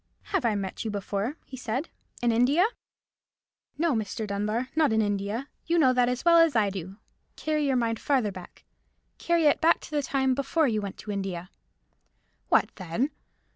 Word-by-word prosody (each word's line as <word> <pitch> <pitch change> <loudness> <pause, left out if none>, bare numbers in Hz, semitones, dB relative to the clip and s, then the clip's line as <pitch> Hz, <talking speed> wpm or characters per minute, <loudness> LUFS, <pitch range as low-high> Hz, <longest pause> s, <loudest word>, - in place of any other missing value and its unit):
"Have 375 -9 +1
I 220 -2 +2
met 195 -2 -4
you 225 - -3
before?" 205 +6 -3
he 265 - -9
said. 255 +5 -3 0.3
"In 240 - +4
India?" 260 - +4 1.1
"No, 325 0 +2
Mr. 220 0 -2
Dunbar, 210 +5 -2
not 315 -5 +3
in 220 - +2
India. 205 +4 -1 0.2
You 340 +1 +2
know 265 -6 +5
that 250 -1 +3
as 250 +5 -3
well 335 -1 +7
as 330 -4 +4
I 210 -3 +3
do. 190 0 -7 0.4
Carry 305 -2 0
your 270 - +2
mind 230 -2 0
farther 255 -8 +1
back. 185 -2 -12 0.6
Carry 340 -2 +2
it 295 - +4
back 330 +1 +4
to - - -11
the 295 -1 +1
time 265 -1 +1
before 280 +4 +1
you 215 -3 0
went 200 -1 -6
to 210 - -7
India." 190 -3 -4 1.0
"What - - +3
then?" 190 - -1
240 Hz, 180 wpm, -27 LUFS, 205-290 Hz, 1.1 s, well